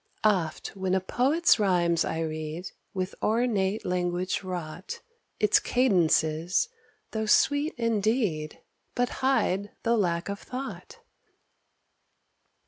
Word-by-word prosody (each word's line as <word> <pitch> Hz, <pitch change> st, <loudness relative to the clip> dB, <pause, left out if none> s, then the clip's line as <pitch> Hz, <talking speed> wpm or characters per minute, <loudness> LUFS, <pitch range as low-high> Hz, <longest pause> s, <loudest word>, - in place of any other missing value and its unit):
Oft 185 Hz, -7 st, +1 dB
when 190 Hz, -1 st, 0 dB
a -, -, +3 dB
poet's 265 Hz, -, +3 dB
rhymes 175 Hz, -4 st, +2 dB
I 160 Hz, -, -2 dB
read, 155 Hz, +2 st, -4 dB, 0.2 s
With 185 Hz, 0 st, -3 dB
ornate 215 Hz, -3 st, +1 dB
language 180 Hz, 0 st, -1 dB
wrought, 180 Hz, -2 st, -6 dB, 0.4 s
Its 210 Hz, -2 st, +4 dB
cadences, 175 Hz, -, +2 dB, 0.4 s
though 220 Hz, -1 st, -2 dB
sweet 285 Hz, +7 st, +3 dB
indeed, 215 Hz, -8 st, 0 dB, 0.3 s
But 245 Hz, 0 st, +1 dB
hide 205 Hz, -7 st, +1 dB
the 235 Hz, 0 st, +3 dB
lack 170 Hz, -5 st, 0 dB
of 200 Hz, 0 st, -4 dB
thought. 260 Hz, +2 st, -7 dB
190 Hz, 105 wpm, -27 LUFS, 175-230 Hz, 0.4 s, Its